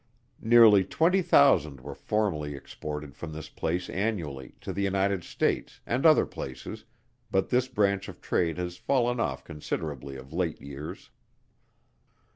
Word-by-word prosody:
Nearly 110 -4 +7
twenty 175 - +2
thousand 85 - +4
were 70 +3 -8
formerly 80 -9 -1
exported 75 +1 -7
from 80 -2 -7
this 80 0 -7
place 90 +3 -2
annually, 85 - -3
to 95 - -5
the 100 - -2
United 100 -1 +1
States, - - -1
and 130 +7 +2
other 155 - +6
places, 65 -1 -7 0.4
but 95 - +1
this 125 0 +2
branch 100 -5 0
of - - -11
trade 85 -2 0
has 90 -1 -4
fallen 125 +1 +1
off - - -1
considerably 75 -3 -5
of 65 +2 -11
late 85 -2 -1
years. 70 +2 -8
90 Hz, 140 wpm, -28 LUFS, 75-110 Hz, 0.4 s, Nearly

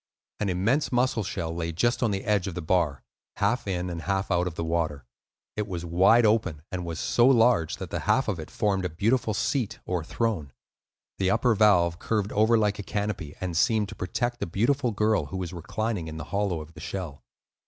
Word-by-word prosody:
An 100 - 0
immense 110 +11 +1
mussel 125 -2 +2
shell 85 -4 -3
lay 85 -1 -2
just 120 +9 +1
on 120 - +2
the 100 -1 -2
edge 105 -3 +1
of 90 - -5
the 90 - -3
bar, 80 -5 +1 0.3
half 115 +3 0
in 90 -2 -1
and 85 -2 -4
half 95 +4 -1
out 90 0 +2
of 85 - -5
the 85 - -3
water. 80 -5 -1 0.5
It 105 -1 -2
was 85 -3 -4
wide 95 +8 +5
open, 105 -9 +1
and 90 -1 -3
was 85 -2 -5
so 120 +1 +3
large 115 - +4
that - - -7
the - - -2
half 135 - +1
of 100 -6 -1
it 80 - -7
formed 100 -3 0
a 90 - -1
beautiful 110 +6 +1
seat 115 -4 -1
or 90 -3 -2
throne. 85 - -2 0.7
The 95 -1 +2
upper 120 +4 +3
valve 90 -5 +4
curved 105 -2 -1
over 110 +2 +4
like 105 -1 +1
a - - -1
canopy, 100 -7 -3
and 90 -2 -3
seemed 110 +2 +2
to - - -8
protect 120 +7 -2
a - - -1
beautiful 125 +9 +1
girl 105 -5 +1
who 85 - -5
was 90 -1 -4
reclining 100 +1 -3
in 80 0 -6
the 80 - -5
hollow 100 -5 0
of 75 +1 -12
the 80 - -12
shell. 85 -6 -5
95 Hz, 215 wpm, -27 LUFS, 85-110 Hz, 0.7 s, wide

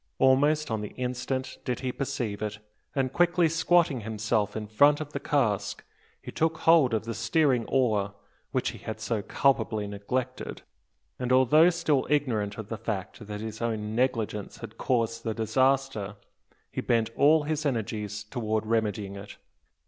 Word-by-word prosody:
Almost 145 +2 +3
on 110 -1 -1
the 105 - -7
instant 130 +1 -3
did 125 - -2
he 130 -1 -1
perceive 120 -6 -3
it; 105 -1 -3 0.4
and 135 -2 0
quickly 175 -1 +3
squatting 165 -4 +2
himself 105 -1 -1
in 110 -1 -3
front 145 +8 +4
of 150 -1 -6
the 140 - -2
cask, 120 -10 0 0.4
he - - -9
took 160 0 0
hold 160 -8 +5
of 110 - -1
the 115 - -3
steering 120 +2 +2
oar, 105 -6 +1 0.4
which - - 0
he - - -11
had 110 -1 -6
so 110 -1 -1
culpably 110 -3 +1
neglected, 120 +6 -4 0.6
and, 125 -1 -2
although 130 +6 +6
still 160 -6 +1
ignorant 115 -9 0
of 110 -1 -7
the 115 - -4
fact 105 0 -5
that 105 0 -5
his 110 0 -6
own 110 -2 -2
negligence 115 -4 -1
had - - -10
caused 115 -2 0
the 110 -1 -2
disaster, 130 -3 +1 0.6
he - - -3
bent 115 -1 +1
all 150 +2 +5
his 155 0 -2
energies 105 -6 -2
towards 110 -1 -2
remedying 105 -3 -1
it. 100 +1 -10
115 Hz, 160 wpm, -28 LUFS, 105-135 Hz, 0.6 s, although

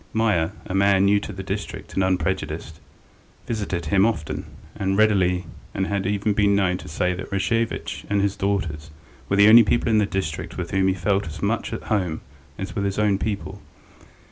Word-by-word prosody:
Meier, 105 -8 +1
a - - -5
man 100 0 +4
new 100 +1 +4
to 105 - -7
the 95 -1 -7
district - - -5
and 95 - +1
unprejudiced, 90 -3 -2 0.7
visited 100 -7 -3
him 95 +6 +3
often 90 -9 -1 0.3
and 95 0 -1
readily 95 -4 +3 0.3
and 95 - 0
had 100 -1 -1
even 105 +1 0
been 100 0 +3
known 95 -2 +1
to - - -10
say 90 +4 0
that 95 +3 -7
Rashevitch 115 +4 -1
and 100 0 +2
his 100 0 +1
daughters 95 -6 -2 0.4
were 100 - +2
the 100 +1 +6
only 115 +2 +10
people 115 +2 +1
in 110 -1 +4
the 105 - +2
district 85 -5 -4
with - - -4
whom 95 0 +2
he 95 - +2
felt 95 +1 0
as 80 -1 -7
much - - -1
at - - -5
home 90 -7 -1 0.4
as 100 +1 -5
with 100 - -1
his 100 -1 -2
own 105 -2 +2
people. 105 -2 -4
95 Hz, 195 wpm, -23 LUFS, 90-105 Hz, 0.7 s, only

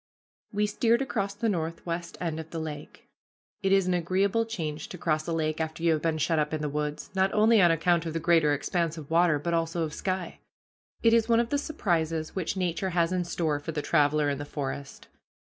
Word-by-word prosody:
We 210 0 +1
steered 230 +4 +2
across 200 -6 -2
the 225 +3 -1
northwest 170 -2 -3
end 165 -3 -2
of 160 0 -7
the 165 - -6
lake. 155 -2 -7 0.5
It 195 -1 +1
is 195 -1 +4
an 185 - +1
agreeable 190 +6 +1
change 155 -8 -4
to 180 - -7
cross 155 -1 -1
a - - -1
lake 155 -1 -1
after 160 +1 -4
you 165 -1 +4
have 155 - -1
been 160 -1 0
shut 160 +1 +1
up 150 +1 0
in 155 - -4
the 150 - -1
woods, 150 +1 -3
not 190 0 +2
only 215 0 +5
on 175 - +6
account 165 0 +2
of 160 - -4
the 165 - -1
greater 165 -3 +3
expanse 165 +3 -1
of 155 -1 -9
water, 165 -2 +4
but 170 +4 -2
also 165 0 0
of 155 -1 -4
sky. 185 -1 -3 0.6
It 230 0 +5
is 230 0 +3
one 230 0 +5
of 235 -1 0
the 285 - +1
surprises 165 - -1
which 190 +1 -2
Nature 180 +1 -1
has 170 -1 +1
in 180 -1 0
store 160 -4 -1
for 155 +2 -6
the 150 -1 -2
traveler 150 -1 +3
in 140 -1 -1
the - - -3
forest. 140 -1 -6
165 Hz, 225 wpm, -28 LUFS, 155-190 Hz, 0.6 s, on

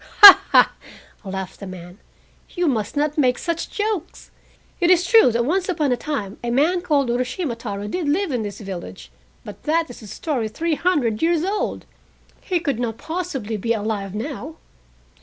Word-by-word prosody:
"Ha, 400 -2 +13
ha!" - - +6 0.5
laughed 190 -1 -6
the 200 - -8
man, 180 +1 -10 0.5
"you 355 -1 -2
must 220 -5 -1
not 300 +1 0
make 250 -3 +3
such 335 -2 -3
jokes. 415 -5 -4 0.5
It 350 -2 +2
is 360 -1 +4
true 445 - +6
that 235 +1 0
once 370 +6 0
upon 305 -6 0
a - - +3
time 235 -7 -5
a 240 - -2
man 310 +9 +2
called 280 -7 +1
Urashima 250 +3 -2
Taro 205 -3 -6
did 310 +6 -2
live 355 +3 0
in 245 -3 -1
this 205 0 -6
village, 135 - -8 0.3
but 210 - -10
that 325 -1 +1
is 245 - -12
a 215 - -11
story 245 - -3
three 320 +10 -2
hundred 290 -10 0
years 330 -1 +2
old. 400 +3 -2 0.6
He 365 -3 -1
could 280 -8 -2
not 230 -2 -3
possibly 310 - -4
be 230 +3 0
alive 205 -3 -3
now!" 275 +5 -5
265 Hz, 175 wpm, -21 LUFS, 215-335 Hz, 0.6 s, Ha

